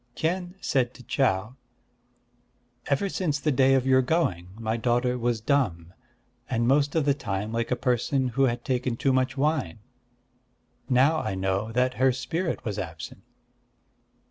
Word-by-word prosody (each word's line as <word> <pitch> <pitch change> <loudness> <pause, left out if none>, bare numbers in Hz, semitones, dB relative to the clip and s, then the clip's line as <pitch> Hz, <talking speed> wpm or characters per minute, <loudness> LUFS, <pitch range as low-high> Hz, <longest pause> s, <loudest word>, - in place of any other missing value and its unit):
Kien 175 +2 -2
said 130 -7 0
to 125 - -13
Chau: 115 -2 0 1.3
"Ever 145 +8 +1
since 175 -6 -1
the 150 +2 +1
day 135 0 +4
of 130 -1 +1
your 130 0 +5
going, 125 - 0
my 110 0 -2
daughter 120 +1 +1
was 120 -2 -1
dumb, 105 - 0 0.6
and 115 -1 0
most 145 +3 +2
of 160 -3 +2
the 140 - +4
time 105 -6 -4
like 115 0 -2
a 125 - +1
person 130 +1 0
who 135 +3 +2
had 120 -1 -2
taken 125 -2 -1
too 135 +1 +1
much 130 +2 0
wine. 140 - 0 1.1
Now 135 +5 +4
I 95 - -3
know 95 +3 -1
that 125 +1 +2
her 130 0 +5
spirit 160 +7 -3
was 105 -2 -3
absent." 80 -3 -7
125 Hz, 155 wpm, -26 LUFS, 115-140 Hz, 1.3 s, your